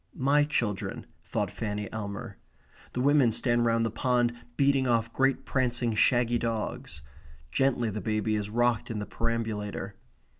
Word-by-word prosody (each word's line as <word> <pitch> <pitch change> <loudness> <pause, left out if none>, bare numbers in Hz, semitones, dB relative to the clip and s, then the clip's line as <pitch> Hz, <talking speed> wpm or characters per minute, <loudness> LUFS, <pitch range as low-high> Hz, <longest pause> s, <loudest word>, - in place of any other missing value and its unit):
My 145 +1 +3
children, 115 -10 -2 0.2
thought - - -2
Fanny 105 -1 -3
Elmer. 105 0 -6 0.5
The 125 - -1
women 140 -3 +4
stand 120 +1 +2
round 115 0 +2
the 115 - -1
pond, 120 +1 +1 0.2
beating 135 -1 +3
off 115 -1 +1
great 135 0 +1
prancing 120 -3 0
shaggy 120 +1 +3
dogs. 110 -9 -3 0.5
Gently 120 - +1
the 105 +1 -4
baby 110 0 0
is 105 -1 -2
rocked 120 0 +1
in 115 - -3
the 105 - -3
perambulator. 110 -2 -3
115 Hz, 145 wpm, -28 LUFS, 110-125 Hz, 0.5 s, women